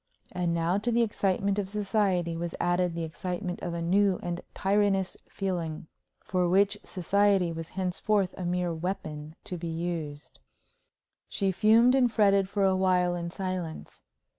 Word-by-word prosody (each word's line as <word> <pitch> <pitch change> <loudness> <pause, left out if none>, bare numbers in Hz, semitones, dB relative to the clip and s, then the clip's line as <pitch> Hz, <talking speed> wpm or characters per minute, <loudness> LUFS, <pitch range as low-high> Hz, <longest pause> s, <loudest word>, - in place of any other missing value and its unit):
And 180 -2 -1
now, 170 +3 +1
to 240 +3 -1
the 235 0 +3
excitement 200 -2 0
of 195 -2 -3
society 195 -4 0
was 170 0 -4
added 175 -1 +1
the 170 - -2
excitement 180 +3 -4
of 170 -1 -3
a 170 - -3
new 190 +2 +3
and 175 0 -3
tyrannous 195 -1 +1
feeling, 175 -5 -3 0.4
for 180 -2 +1
which 200 +3 +3
society 195 0 +2
was 165 0 -6
henceforth 190 +1 0
a 185 - -6
mere 175 0 -1
weapon 160 -3 -5
to 180 - -5
be 170 - -4
used. 160 -3 -5 0.9
She 195 -2 0
fumed 225 +6 +5
and 255 -3 +3
fretted 200 -3 +3
for 200 -1 0
a 190 -1 +4
while 180 -1 +2
in 170 -1 -3
silence. 185 -3 -5
185 Hz, 155 wpm, -28 LUFS, 170-200 Hz, 0.9 s, fumed